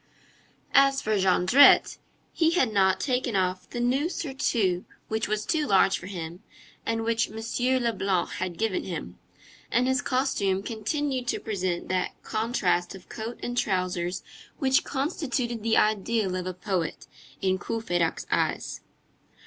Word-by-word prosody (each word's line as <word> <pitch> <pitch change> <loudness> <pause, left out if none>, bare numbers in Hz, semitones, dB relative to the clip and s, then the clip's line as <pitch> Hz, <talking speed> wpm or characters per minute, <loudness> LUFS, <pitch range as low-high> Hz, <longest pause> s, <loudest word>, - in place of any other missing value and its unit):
As 275 -1 +5
for 215 -5 0
Jondrette, 190 +7 +5 0.3
he 325 0 +2
had 260 -11 +2
not 190 -2 +3
taken 250 -4 -1
off 185 -1 -1
the 240 - -5
new 260 +7 +1
surtout, 240 - 0 0.3
which 220 0 -1
was 210 +1 -1
too 315 -3 0
large 195 0 +4
for 185 - -9
him, 175 -2 -6 0.5
and 225 0 0
which 230 0 +1
M. 220 - -10 0.5
Leblanc 195 -6 0
had 180 -2 -4
given 220 -4 0
him, 150 - -6 0.5
and 245 +2 +2
his 260 -1 +2
costume 230 -8 0
continued 255 +4 -2
to - - 0
present 185 -5 -2
that 185 0 -1
contrast 205 -6 0
of 190 - -14
coat 225 +2 -6
and 245 - -3
trousers 180 -4 -1 0.3
which 265 -1 +3
constituted 265 -5 -2
the 225 +1 +2
ideal 215 -2 +1
of 185 0 -3
a 185 - -3
poet 185 -3 -3 0.3
in 190 -1 +1
Courfeyrac's 175 -7 -1
eyes. - - -1
215 Hz, 140 wpm, -27 LUFS, 185-250 Hz, 0.5 s, As